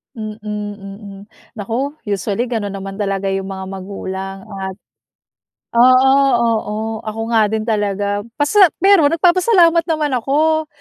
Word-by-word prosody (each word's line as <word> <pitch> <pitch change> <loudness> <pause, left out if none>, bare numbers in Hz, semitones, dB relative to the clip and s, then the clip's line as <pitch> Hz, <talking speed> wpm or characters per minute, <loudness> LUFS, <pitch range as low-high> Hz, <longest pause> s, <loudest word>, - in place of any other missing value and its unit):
Mm, 215 -1 -7
mm. 205 -1 -7 0.4
Naku 235 +7 -2 0.2
usually 200 +4 -1
gano'n 215 -4 -3
naman 195 0 -7
talaga 195 -1 -2
yung 195 0 -2
mga 190 0 -6
magulang 195 0 -6
at 190 -2 -6 1.0
oo, 255 +2 +6 0.3
oo 225 -3 0 0.3
ako 220 +1 -5
nga 215 -1 +4
din 220 0 -1
talaga 205 -1 -1 0.2
pasa 340 +8 +5 0.2
pero 385 -7 +5
nagpapasalamat 345 0 +4
naman 305 -3 0
ako 310 +5 +1
215 Hz, 120 wpm, -18 LUFS, 195-275 Hz, 1.0 s, oo